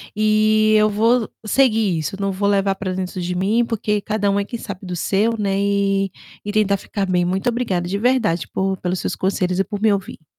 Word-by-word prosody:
e 215 0 +3
eu 215 0 +4
vou 225 +3 +2 0.2
seguir 220 -5 +2
isso, 160 +4 -3
não 195 - 0
vou 195 +2 -1
levar 195 -1 +2
pra 190 -1 -4
dentro 185 0 -4
de 180 0 -2
mim, 210 +6 +1
porque 220 -2 -1
cada 210 -1 -1
um 200 0 +1
é 200 - -1
quem 235 +2 -6
sabe 190 -4 -7
do 180 -1 -4
seu, 205 +6 +1
né, 195 -1 0
e 200 -1 +1 0.3
e 205 - -2
tentar 205 -2 +2
ficar 195 0 -4
bem, 180 -1 +1
muito 190 +6 0
obrigada 215 -8 -1
de 195 +3 -2
verdade, 220 -7 +1
por 190 0 -1
pelos 180 0 -2
seus - - -3
conselhos 185 -1 -1
e - - +4
por 205 0 -6
me 220 -1 +4
ouvir. 190 -5 -4
200 Hz, 220 wpm, -20 LUFS, 190-215 Hz, 0.3 s, eu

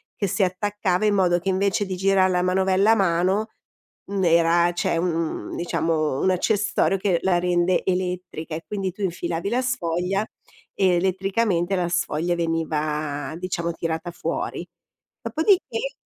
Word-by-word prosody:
che 200 - -1
si 195 +2 +1
attaccava 190 +1 0
in 205 -1 +3
modo 175 -2 +3
che 190 +3 -3
invece 195 +1 +1
di 190 -1 -4
girar 190 0 +3
la 180 -1 +1
manovella 190 +3 +3
a - - +6
mano, 190 +3 +1 0.6
n'era 170 -2 +3
c'è 170 - 0
un 165 -2 -2
diciamo, 160 -4 -1
un 190 - +2
accessorio 195 0 +1
che 185 -3 +1
la 180 -2 +3
rende 180 0 +1
elettrica 180 -3 -3
e 165 - -6
quindi 195 -3 -2
tu 205 - -12
infilavi 175 0 -2
la 250 +3 +1
sfoglia 195 -4 -1 0.5
e 190 - +2
elettricamente 190 0 0
la 175 -2 0
sfoglia 175 0 0
veniva 155 -3 -2
diciamo 170 -2 -2
tirata 165 +1 -3
fuori. 175 - -4 0.5
Dopodiché 405 +8 +1
180 Hz, 140 wpm, -23 LUFS, 170-195 Hz, 0.6 s, a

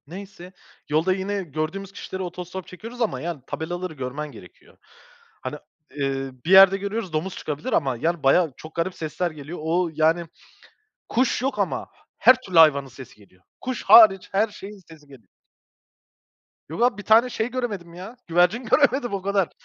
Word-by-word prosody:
Neyse, 185 +1 -11 0.4
yolda 160 +5 +2
yine 195 +1 -3
gördüğümüz 160 +5 -5
kişilere 190 -1 -6
otostop 180 +1 -7
çekiyoruz 230 +6 -10
ama, 230 - -1
yani, 165 -4 -5
tabelaları 175 +2 -5
görmen 145 +2 -6
gerekiyor. 90 -8 -16 0.6
Hani, - - -5 0.4
eee, 135 -1 -2
bir 175 - -1
yerde 195 0 +8
görüyoruz, 200 -2 -4
"Domuz 170 +4 -2
çıkabilir." 155 - -5
Ama, 135 -4 +1
yani, 165 +4 -2
bayağı, 150 +2 +3
çok 155 0 -12
garip 170 +2 -2
sesler 170 +2 -3
geliyor. 155 +2 -9
O, 170 +3 0
yani, 160 +2 +2 0.8
kuş 255 0 +1
yok 270 +2 -2
ama - - -2 0.3
her 255 - +6
türlü 185 -9 +2
hayvanın 140 -4 +5
sesi 130 -1 -13
geliyor. 95 -3 -23 0.2
Kuş 255 -1 -4
hariç, 195 -5 +7
her 205 +3 +2
şeyin 205 -1 -11
sesi 155 -2 -16
geliyor. 130 -9 -17 1.4
Yok 165 +9 -5
abi, 245 -4 +2
bir 205 - -8
tane 225 +4 +5
şey 230 0 -3
göremedim 205 -9 -4
ya, 190 +8 -10
güvercin 175 +8 +2
göremedim, 265 -2 +2
o 195 - -2
kadar. 195 -2 0
180 Hz, 160 wpm, -23 LUFS, 155-200 Hz, 1.4 s, yerde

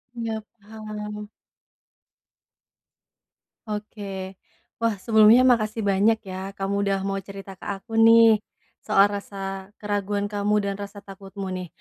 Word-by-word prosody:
Iya, 225 -2 -3 0.2
paham. 210 0 -7 2.4
Oke. 200 -3 -6 0.4
Wah, 230 -2 +1
sebelumnya 220 +4 +6
makasih 225 -3 +2
banyak 205 +3 +2
ya, 190 +1 -7
kamu 195 0 -2
udah 195 0 +1
mau 195 0 -1
cerita 195 0 -10
ke - - -11
aku 210 +3 -3
nih, 225 -1 +7 0.4
soal 205 -1 +4
rasa 195 -1 -5
keraguan 205 0 -2
kamu 205 +1 +1
dan 200 0 -2
rasa 200 0 -8
takutmu 195 0 -8
nih. 185 -1 -4
205 Hz, 115 wpm, -24 LUFS, 195-215 Hz, 2.4 s, nih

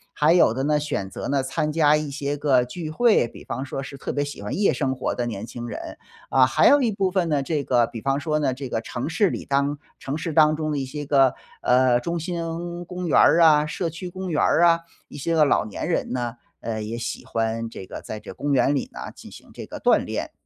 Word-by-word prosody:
还 150 +2 +4
有 170 -10 +5
的 135 +2 -2
呢， 150 +1 +2
选 120 -10 -3
择 - - -6
呢 140 -1 +1
参 150 +3 -2
加 150 -1 +4
一 150 -1 -2
些 145 +1 -2
个 135 -4 +3
聚 155 +5 -6
会， 215 - +3
比 - - -13
方 130 +3 -4
说 135 0 -5
是 140 - -9
特 - - -4
别 145 - 0
喜 145 -7 -7
欢 105 - -3
夜 200 0 +3
生 135 -3 -1
活 - - -2
的 120 - -2
年 110 -2 -4
轻 120 0 -7
人。 - - -7 0.3
啊， 130 -1 +5
还 - - +4
有 285 0 +6
一 230 -3 +2
部 195 -1 0
分 180 -3 0
呢， 145 -3 +1
这 145 0 -1
个 120 -2 +3
比 115 - -7
方 135 +2 0
说 155 +1 -1
呢， 140 -4 +1
这 135 -1 -6
个 115 - -2
城 120 +3 -5
市 190 +4 +2
里 - - -5
当 140 +1 0 0.2
城 140 +3 -4
市 165 0 -3
当 155 0 +5
中 155 0 -2
的 150 - -1
一 135 - -2
些 145 +3 -6
个， 135 -3 +4 0.3
呃， 125 -1 +4
中 170 +6 -3
心 170 +1 -4
公 180 0 -6
园 155 - +4
儿 170 - +6
啊， 150 -2 +6
社 175 +2 -2
区 180 +2 -7
公 185 +1 -6
园 150 - +1
儿 170 - +3
啊， 170 -1 +5 0.3
一 - - -10
些 165 +4 -1
个 155 -2 +5
老 - - +2
年 105 - -5
人 - - -1
呢， 120 -2 -3 0.3
呃， 110 -1 -3
也 110 +2 -4
喜 115 - -5
欢 115 0 -2
这 95 - -9
个 - - -8
在 110 - -7
这 - - -10
公 145 +1 -2
园 135 +1 +3
里 135 - -2
呢， 60 0 -7
进 - - -12
行 - - -14
这 - - -8
个 - - -8
锻 - - +4
炼。 - - -4
145 Hz, 275 characters per minute, -24 LUFS, 125-165 Hz, 0.3 s, 有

